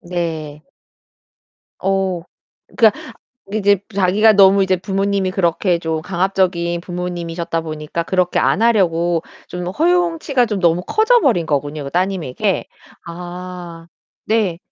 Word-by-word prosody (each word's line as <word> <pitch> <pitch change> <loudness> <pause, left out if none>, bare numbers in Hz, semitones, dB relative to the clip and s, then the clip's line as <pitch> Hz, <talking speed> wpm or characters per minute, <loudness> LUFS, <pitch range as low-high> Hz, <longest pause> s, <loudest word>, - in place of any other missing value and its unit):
네. 160 -4 -4 1.2
어. 190 -2 0 0.6
그러니까 220 -4 +3 0.4
이제 205 -2 +2
자기가 200 +3 +4
너무 195 -1 +6
이제 190 -1 +2
부모님이 195 +1 -1
그렇게 175 -1 +1
좀 160 -1 -2
강압적인 180 -2 0
부모님이셨다 175 -2 -4
보니까 155 +1 -4
그렇게 180 0 0
안 210 - +2
하려고 175 -7 +2 0.3
좀 180 0 -5
허용치가 325 - +1
좀 210 -4 -3
너무 170 0 +2
커져 460 +2 +3
버린 200 -11 +2
거군요. 145 0 -2
그 140 - -6
따님에게. 185 +1 -1 0.4
아 175 -1 -8 0.4
네. 210 -6 +1
180 Hz, 265 characters per minute, -18 LUFS, 170-200 Hz, 1.2 s, 너무